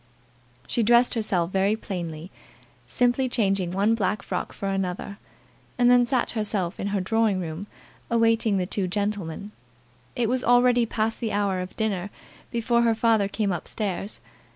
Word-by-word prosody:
She 235 - 0
dressed 240 +2 +4
herself 190 -6 0
very 195 +2 +2
plainly, 175 -5 -6 0.6
simply 245 +1 +1
changing 195 -6 +1
one 200 +5 +2
black 205 -2 -1
frock - - -3
for 200 - -5
another, 195 +1 -3 0.6
and 245 0 +5
then 245 -1 +5
sat 255 -2 +1
herself 205 -5 -2
in 200 - -2
her 200 0 0
drawing 215 +1 +1
room 170 +3 -5 0.4
awaiting 230 -2 +2
the 185 - 0
two 190 0 -2
gentlemen. 200 -1 -3 0.6
It 240 -3 +1
was 250 +2 0
already 245 0 +4
past 220 0 -1
the 225 -2 -2
hour 200 -2 0
of 180 0 -6
dinner 205 -4 -1 0.4
before 235 0 +1
her 230 -1 +3
father 220 -3 +3
came 200 0 -1
up 175 - -4
stairs. 200 -1 -3
210 Hz, 155 wpm, -25 LUFS, 190-230 Hz, 0.6 s, and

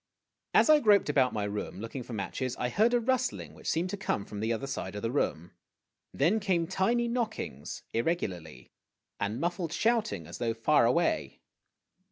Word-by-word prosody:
As - - +6
I 305 -1 +7
groped 205 - +4
about 130 -3 +3
my 105 - -2
room, 105 -1 -4
looking 115 +5 -5
for 120 0 -8
matches, 115 +5 -3
I 125 - -1
heard 225 - +3
a - - +4
rustling 110 - -1
which 80 - -6
seemed 175 +3 0
to 205 - -3
come 105 - -2
from 105 - -7
the 110 +2 0
other 115 +4 -2
side 105 -8 -4
of 105 - -5
the 115 - 0
room. 85 - -1 0.6
Then 175 +11 +2
came 185 -5 +1
tiny 210 +7 +1
knockings, 220 - -3
irregularly, 100 - -2 0.5
and 105 +4 -2
muffled 170 0 -2
shouting, 220 - +1
as 85 - -9
though 115 -2 -1
far 115 +1 +4
away. 170 +8 0
135 Hz, 180 wpm, -30 LUFS, -, 0.6 s, I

